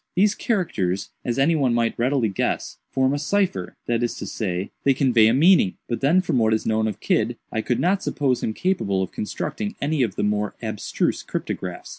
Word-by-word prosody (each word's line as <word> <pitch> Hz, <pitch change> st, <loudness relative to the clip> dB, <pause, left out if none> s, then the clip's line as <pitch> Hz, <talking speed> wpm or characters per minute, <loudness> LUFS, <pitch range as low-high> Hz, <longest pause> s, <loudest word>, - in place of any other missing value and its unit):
These 200 Hz, +3 st, +4 dB
characters, 105 Hz, -, -1 dB
as 120 Hz, -, -2 dB
any 145 Hz, +5 st, +3 dB
one 130 Hz, -6 st, +2 dB
might 115 Hz, -1 st, +1 dB
readily 125 Hz, 0 st, +1 dB
guess, 95 Hz, -, -2 dB
form 130 Hz, 0 st, +1 dB
a 145 Hz, -, -1 dB
cipher—that 130 Hz, -, -1 dB
is 120 Hz, -, -1 dB
to -, -, -6 dB
say, 95 Hz, -3 st, -3 dB
they 135 Hz, -1 st, +4 dB
convey 120 Hz, -5 st, +4 dB
a -, -, +4 dB
meaning; 160 Hz, -, +4 dB
but 120 Hz, -, -3 dB
then, 160 Hz, +7 st, +4 dB
from 160 Hz, -8 st, 0 dB
what 110 Hz, -1 st, +3 dB
is 110 Hz, -, -3 dB
known 110 Hz, 0 st, +1 dB
of 105 Hz, -, -4 dB
Kidd, 115 Hz, +2 st, 0 dB
I 110 Hz, -, -1 dB
could 120 Hz, +1 st, -1 dB
not 190 Hz, +3 st, +2 dB
suppose 135 Hz, -5 st, 0 dB
him 110 Hz, -, -2 dB
capable 100 Hz, -, 0 dB
of 95 Hz, -, -6 dB
constructing 210 Hz, -, -4 dB
any 150 Hz, 0 st, 0 dB
of 115 Hz, -6 st, 0 dB
the -, -, -1 dB
more 105 Hz, 0 st, 0 dB
abstruse -, -, -2 dB
cryptographs. -, -, -5 dB
120 Hz, 200 wpm, -23 LUFS, 110-155 Hz, -, These